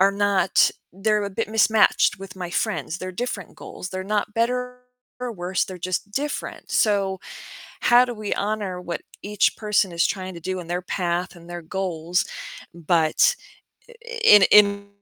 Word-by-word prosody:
are 195 +1 +5
not 200 -2 +3 0.2
they're 210 +2 0
a 200 - -4
bit 220 +3 -3
mismatched 220 -3 +3
with 195 -1 -10
my 180 -2 -5
friends. 180 -3 -2
They're 185 0 -6
different 210 -3 -5
goals, 180 - -8
they're 185 0 -4
not 210 +1 -1
better 250 +2 -1 0.4
or 245 -2 -3
worse, 180 -1 -1
they're 185 -1 -9
just 185 +3 -3
different. 290 +4 -4
So 195 -3 +1 0.6
how 240 +1 +6
do 245 - -5
we 210 -2 -5
honor 200 -3 -2
what 170 -2 -5 0.2
each 205 0 +1
person 210 -3 +1
is 170 - +2
trying 185 -2 -4
to 170 - -9
do 185 +2 -3
in 170 - -10
their 180 +1 -2
path 180 0 -2
and 170 0 -14
their 175 0 -5
goals, 175 -1 -2 0.5
but 165 - +2 0.9
in 210 -2 +9
in 200 -1 +5
195 Hz, 165 wpm, -23 LUFS, 180-210 Hz, 0.9 s, in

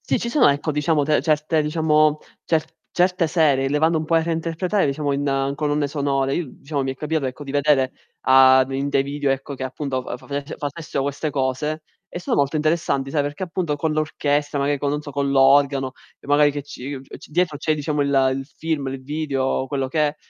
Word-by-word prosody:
Sì, - - 0
ci 235 - -3
sono, 280 - +5
ecco, 145 +2 0
diciamo 150 0 +1
de 150 -2 +2
certe, 155 +1 +1
diciamo, 155 -1 +2 0.3
cer 160 -2 +1 0.3
certe 180 -1 +2
serie, 150 -5 +2
le 145 - 0
vanno 160 +1 +3
un 155 - -3
po' 165 - +1
a 165 - +4
reinterpretare, 165 +4 0
diciamo, 145 +1 -1
in 140 -1 0
colonne 145 0 0
sonore. 140 -2 0
I 165 -7 -4
diciamo 140 -1 -2
mi 135 - -2
è - - -11
capitato 150 +1 -2
ecco 130 +3 -6
di 140 - -7
vedere 145 -2 +2 0.3
a 130 0 +6
d 130 - -11
in 135 +1 -1
dei 135 -1 +2
video, 140 0 -2
ecco, 135 +1 -2
che 130 - -8
appunto 130 0 -3
fa - - -5
faveffe 140 +3 -6
facessero 145 -1 -4
queste 145 +3 -2
cose 145 +3 -2 0.3
e - - -6
sono 180 - -1
molto 140 +2 +1
interessanti, 150 -3 0
sai, 150 - +1
perché 145 +3 -4
appunto 170 -4 -2
con 155 +2 -1
l'orchestra 145 -1 -1
magari 140 +1 +1
co 140 - -1
non 150 +1 -2
so, 145 - -8
con 140 0 -1
l'organo 135 0 +4 0.3
e - - -17
magari 145 +1 +4
che 145 0 -5
ci 145 -1 -7
uhm, 130 - -8
c - - -12
dietro 165 -2 0
c'è 155 +1 +1
diciamo 150 0 -2
il 140 - +1 0.3
il 135 0 -5
film, 155 0 -3
il 135 0 -6
video, 135 -3 -1
quello 135 -1 -2
che 150 +1 +2
è, 145 - -7
145 Hz, 220 wpm, -22 LUFS, 135-155 Hz, 0.3 s, a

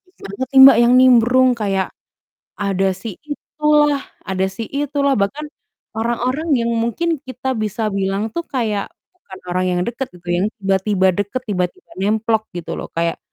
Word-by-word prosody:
banget 200 +7 -6
sih 265 - +8
Mbak 270 - +9
yang 240 +1 +5
nimbrung, 255 0 +5
kayak 195 -2 -1 0.7
ada 195 -1 0
si 190 +1 -7
itulah 295 -1 +1 0.2
ada 190 0 0
si 220 +4 -6
itulah, 280 -1 0
bahkan, 270 +10 -1 0.5
orang-orang 245 +7 -1
yang 235 0 0
mungkin 270 +8 -1
kita 260 +1 -4
bisa 215 0 -2
bilang 195 +2 -1
tuh 340 - -2
kayak, 220 -6 -2 0.3
bukan 190 - -13
orang 185 +1 0
yang 175 - 0
dekat 245 +2 -3
gitu, 180 0 -17
yang 175 +3 +1 0.2
tiba-tiba 195 0 +1
dekat, 205 +6 -3
tiba-tiba 180 -4 -3
nemplok 220 +2 0
gitu 175 - -5
loh. - - -5
Kayak 170 0 0
220 Hz, 155 wpm, -19 LUFS, 195-260 Hz, 0.7 s, Mbak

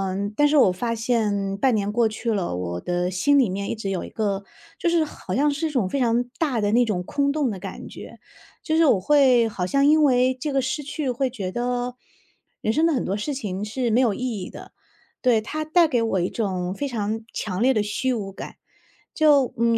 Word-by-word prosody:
嗯， 200 +2 -3
但 295 - +5
是 300 - +1
我 225 -10 +6
发 230 +5 -2
现 210 -4 0
半 255 +2 +2
年 205 -1 -1
过 230 +1 +2
去 225 +2 -3
了， 185 - -2
我 90 -1 -4
的 180 - -2
心 235 +11 +3
里 255 -8 +4
面 200 +2 -3
一 - - -2
直 205 -3 -5
有 190 -2 -2
一 - - -9
个 200 -2 -2 0.3
就 345 - +1
是 335 -2 +3
好 190 -10 -6
像 290 +3 +3
是 305 +3 -2
一 - - -4
种 245 -11 0
非 275 - -1
常 240 0 +2 0.2
大 275 -9 0
的 205 0 +1
那 240 +2 +4
种 185 -5 -2
空 280 +8 0
洞 290 -5 0
的 195 - -6
感 - - -8
觉， - - -11 0.5
就 315 -1 0
是 330 - +5
我 210 -9 +3
会 255 -3 +4
好 185 -3 -3
像 275 +4 +2
因 310 +1 +5
为 255 -2 +3
这 275 +3 -4
个 270 - +2
失 265 +4 -2
去 285 -1 -3
会 260 +2 -1
觉 200 -7 -5
得 245 +2 -2 0.6
人 215 - +1
生 315 +8 +2
的 330 - +3
很 260 - 0
多 195 +2 -2
事 285 +8 -3
情 205 -7 -4
是 235 +3 -2
没 230 +3 +3
有 235 -6 +3
意 - - -7 0.2
义 180 - -6
的。 - - -11 0.5
对， 240 -4 +3
它 310 +8 -4
带 330 +1 +4
给 245 -5 +1
我 195 -5 0
一 175 - 0
种 185 -5 -2
非 285 +8 -3
常 220 -3 -3
强 190 -2 -3
烈 260 +2 +4
的 215 -4 +1
虚 255 +5 -1
无 200 -4 -4
感。 - - -9 0.6
就， 290 -5 +4
嗯， 230 0 +2
235 Hz, 255 characters per minute, -23 LUFS, 200-275 Hz, 0.6 s, 我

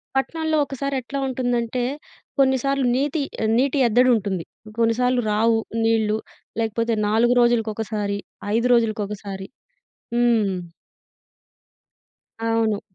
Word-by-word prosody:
పట్నాల్లో 315 +3 0
ఒకసారి 275 0 -3
ఎట్లా 275 +3 -5
ఉంటుందంటే 245 -1 -1 0.6
కొన్నిసార్లు 270 0 +2
నీతి 290 +3 0 0.4
నీటి 275 +2 +2
అద్దడి 250 +3 +4
ఉంటుంది, 190 -5 -2 0.4
కొన్నిసార్లు 245 +2 +2
రావు 225 +1 +3 0.2
నీళ్ళు 220 -1 +2 0.4
లేకపోతే 230 +1 0
4 230 +3 +3
రోజులకొకసారి, 220 -3 0 0.4
5 235 +2 +2
రోజులకొకసారి. 210 -4 -1 0.7
హ్మ్. 230 -5 +3 2.0
అవును. 225 -2 +1
230 Hz, 90 wpm, -22 LUFS, 215-255 Hz, 2.0 s, అద్దడి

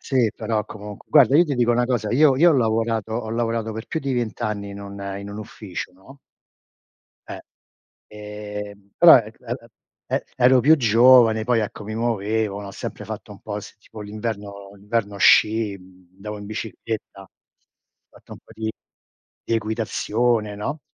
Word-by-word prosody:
Sì, 125 -5 +1
però 110 -2 -2
comunq 105 -1 -10
guarda 140 -3 +6
io 170 - +6
ti 150 -4 -2
dico 120 -1 +2
una 120 +1 +2
cosa: 115 -4 -1
io 140 +1 +5
io 170 +5 +6
ho - - +4
lavorato 115 -2 0
ho 115 -2 -3
lavorato 115 -1 -1
per 110 +1 -7
più 160 - -2
di 140 -2 -2
20 120 -1 -3
anni 105 -2 -3
in 100 - -8
un 100 0 -9 0.2
in 100 0 -8
un 100 - -7
ufficio, 100 -4 -7
no? 115 +10 -17 1.1
Eh. - - -7 0.7
Ehm, 105 -1 -8
però, 170 -1 +9
er 115 -3 -2
a 120 - -5
a 115 - -18 0.4
e - - -1
ero 130 0 +5
più 155 +6 +6
giovane, 115 -2 +5
poi 120 -1 +2
ecco 105 0 -5
mi 110 +1 -6
muovevo, 110 -2 -1
ho 100 - -7
sempre - - -7
fatto - - -7
un - - -14
po' - - -5
s - - -11
tipo 110 - -13
l'inverno 105 -2 -6
l'inverno 105 0 -3
sci, 105 +1 +4
mhmm, 90 -1 -20
andavo 105 +2 -7
in 100 - -9
bicicletta, 110 -1 -6
ho 95 - -17 0.8
fatto - - -16
un - - -10
po' - - -19
di 110 0 -3 0.8
di - - -2
equitazione, 110 0 -1
no, 140 +9 -4
110 Hz, 180 wpm, -22 LUFS, 105-120 Hz, 1.1 s, però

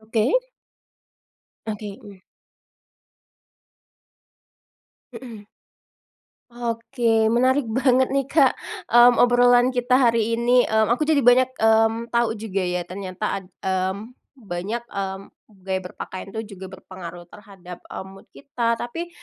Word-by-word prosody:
Oke. 220 +1 0 1.4
Oke, 210 -2 -6
mhm. 200 -2 -13 2.9
Mhm. 230 -3 -10 1.1
Oke, 230 -1 0
menarik 260 +3 +2
banget 255 +3 +2
nih, 275 -1 0
Kak, 280 -5 +4 0.4
mmm, 240 0 +7
obrolan 245 +1 +4
kita 250 +1 +2
hari 230 -3 +2
ini, 245 +1 +3
mmm, 220 +1 +2
aku 305 +5 -1
jadi 285 -5 +3
banyak, 250 +1 +5
mmm, 225 +1 +2
tahu 235 -1 +1
juga 200 -2 -3
ya, 180 -1 -2
ternyata 190 +2 -4
ad - - -17 0.2
mmm, 190 +4 -2 0.3
banyak, 195 +6 -4
mmm, 195 -3 -5 0.4
gaya 190 -1 -2
berpakaian 185 +1 -8
itu 220 -2 -6
juga 190 0 -9
berpengaruh 175 -2 -10
terhadap, 195 -4 -12
eee, - - -7
mood 195 0 -15
kita. 235 -5 -2
Tapi, 330 +10 -5
225 Hz, 115 wpm, -22 LUFS, 195-245 Hz, 2.9 s, mmm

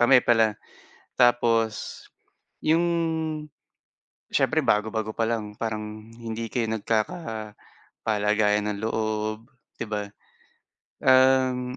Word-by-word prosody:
kami 125 +1 +6
pala. 110 -2 +4 0.7
Tapos 115 -2 +2 0.6
'yong 165 +2 +3 1.5
siyempre - - +3
bago-bago 110 +1 0
pa 115 - +1
lang 105 -3 -3
parang 110 -1 -5
hindi 115 0 -5
kayo 115 -3 0
nagkakapalagayan 110 - -3 1.0
ng 100 - -4
loob, 110 +1 -2 0.3
'di 115 - -2
ba. 105 -1 -2 1.0
Um, 130 -1 +4
115 Hz, 85 wpm, -25 LUFS, 110-120 Hz, 1.5 s, kami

